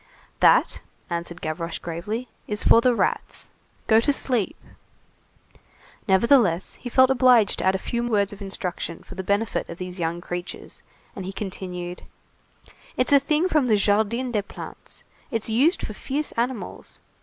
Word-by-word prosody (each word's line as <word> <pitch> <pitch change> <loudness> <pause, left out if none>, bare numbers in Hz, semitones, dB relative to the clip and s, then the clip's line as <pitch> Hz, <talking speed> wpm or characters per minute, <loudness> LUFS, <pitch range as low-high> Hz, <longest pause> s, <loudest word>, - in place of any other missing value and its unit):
"That," - - +4 0.3
answered 170 0 -4
Gavroche 165 +1 -3
gravely, 205 +9 -4 0.2
"is 210 -1 -1
for 230 - +6
the 250 0 +3
rats. - - -2 0.3
Go 220 0 +5
to 230 - +2
sleep!" 250 -7 0 1.5
Nevertheless, 195 -3 +4
he 245 - -5
felt 260 +2 +5
obliged 245 -5 +4
to - - -2
add 190 0 +3
a - - +2
few 235 +5 -3
words 205 -3 +1
of 205 - -12
instruction 180 -3 -4
for - - -11
the 190 - -4
benefit 200 +4 -1
of - - -7
these 180 0 -7
young 170 0 -1
creatures, 175 0 -7 0.3
and 195 - -5
he 185 - -5
continued:— 180 -3 -6 1.0
"It's 255 +3 +2
a 280 - +8
thing 305 +5 +1
from 305 -7 +2
the 215 -3 +4
Jardin 220 +5 +1
des 210 -3 +1
Plantes. 200 - -11 0.3
It's 225 -3 -2
used 285 - +3
for - - -7
fierce 290 +3 -3
animals. 240 -1 -4
210 Hz, 155 wpm, -24 LUFS, 180-245 Hz, 1.5 s, a